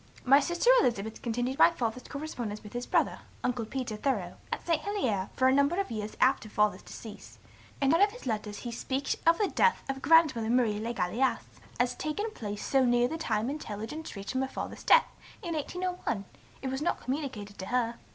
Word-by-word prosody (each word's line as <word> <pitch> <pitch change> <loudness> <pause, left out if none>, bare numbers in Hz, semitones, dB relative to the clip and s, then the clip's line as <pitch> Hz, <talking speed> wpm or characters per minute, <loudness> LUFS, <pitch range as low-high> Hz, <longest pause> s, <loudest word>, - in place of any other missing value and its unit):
My 275 +2 +7
sister 345 +10 +3
Elizabeth 220 - -1
continued 245 +3 -2
my - - +8
Father's 250 -6 -3
correspondence 245 -8 -5
with 210 - -11
his 245 0 -4
brother, - - +1 0.2
Uncle 245 -2 -1
Peter 245 -1 -4
Thoreau, 210 -7 -2
at - - -3
St. 330 -3 +1
Helier, 255 - -1
for 260 - +3
a 260 - +5
number 280 +6 +3
of 395 - -2
years 215 -1 -5
after 255 -4 +3
Father's 210 0 +1
decease, 215 -2 -11 0.4
and 275 +1 +3
in 330 - +4
one - - +3
of - - -11
his 485 - -12
letters 210 -3 -3
he 240 - -5
speaks 265 +4 -2
of 335 0 +6
the 415 - +2
death 470 - +2
of 270 0 -3
grandmother, 280 -7 +4
Marie 230 -4 +2
Le 230 +2 -2
Gallais, 240 +5 +1 0.4
as 245 0 +2
taken 410 - -3
place 205 - -5
so 270 -1 +3
near 245 0 +3
the 315 - -4
time 220 -7 0
intelligence 275 +1 -5
reach'd 200 +3 -5
them 260 - 0
of 265 - -1
Father's - - -6
death, 485 - +6 0.4
in 340 -2 -3
1801, 355 - -3 0.4
it 265 - -1
was 265 +2 -3
not 325 - 0
communicated 250 -7 -4
to 190 - -5
her. 235 -1 0
250 Hz, 200 wpm, -29 LUFS, 220-300 Hz, 0.4 s, my